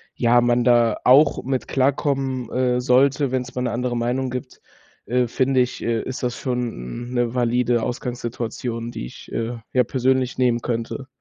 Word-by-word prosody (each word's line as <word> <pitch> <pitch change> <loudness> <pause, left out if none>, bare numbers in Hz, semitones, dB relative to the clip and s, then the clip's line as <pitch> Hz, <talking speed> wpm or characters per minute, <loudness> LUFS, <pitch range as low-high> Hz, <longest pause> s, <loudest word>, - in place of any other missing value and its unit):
ja, 120 0 +4
man 120 0 +2
da 120 -2 +4
auch 140 +4 +5
mit 130 -1 -2
klarkommen, 135 -2 0
äh, 125 -1 +1
sollte, 135 +2 +3
wenn's 130 -1 -2
mal 125 - -1
'ne 120 - -1
andere 120 0 -1
Meinung 125 +2 -1
gibt, 125 +1 -7 0.4
äh, 125 0 +1
finde 130 +2 +1
ich, 125 0 0
äh, 115 -1 0
ist 130 -1 -6
das 120 0 -2
schon 120 - -4
'n - - -7
'ne 120 -1 0
valide 120 -1 +1
Ausgangssituation, 120 -1 -4
die 120 - -6
ich, - - -13
äh, 115 +1 -2 0.2
ja, 125 -1 +4
persönlich 130 +1 0
nehmen 120 -2 +2
könnte. 120 +3 -3
125 Hz, 170 wpm, -22 LUFS, 120-130 Hz, 0.4 s, auch